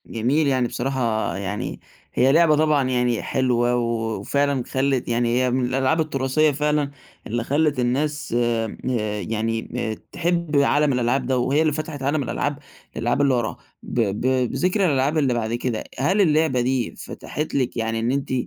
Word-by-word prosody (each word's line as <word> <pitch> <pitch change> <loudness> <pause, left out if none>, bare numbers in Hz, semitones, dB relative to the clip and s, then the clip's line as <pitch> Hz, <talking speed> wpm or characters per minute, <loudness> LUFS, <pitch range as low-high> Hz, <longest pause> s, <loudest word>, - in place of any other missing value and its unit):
جميل، 135 +7 0
يعني 130 -3 +2
بصراحة 120 -4 -1
يعني 100 +1 -4 0.3
هي 130 +2 +4
لعبة 160 0 +5
طبعًا 150 -3 +2
يعني 125 -2 +1
حلوة 125 -2 +1
وفعلًا 120 +4 0
خلّت 135 0 0
يعني 120 0 +1
هي 125 -1 +1
من 125 0 +1
الألعاب 130 +5 +1
التراثية 150 0 +1
فعلًا، 150 0 0 0.4
اللي 120 +1 -2
خلّت 145 +1 +1
الناس 140 +3 -1
ه 120 -2 0 0.4
يعني 110 +3 -2
م 120 -3 -2 0.2
تحب 170 -3 0
عالم 145 0 +3
الألعاب 125 +2 +1
ده 130 -1 +1
وهي 135 +5 +2
اللي 155 -2 +2
فتحت 155 -1 -5
عالم 145 +1 +1
الألعاب 145 +2 -2 0.4
للألعاب 120 +4 0
اللي 140 -2 +3
وراها، 120 -3 -1 0.3
ب - - -9
ب 105 -2 -1 0.3
بذِكر 180 +9 +1
الألعاب 145 -1 +1
اللي 135 -5 +2
بعد 115 -1 -2
كده، 120 -1 -2 0.2
هل 185 +10 +2
اللعبة 155 -7 +3
دي 125 -1 -1
فتحت 150 +2 -6
لِك 130 -3 0
يعني 115 0 -1
إن 115 +2 0
أنتِ 135 -1 -2
130 Hz, 160 wpm, -23 LUFS, 120-145 Hz, 0.4 s, لعبة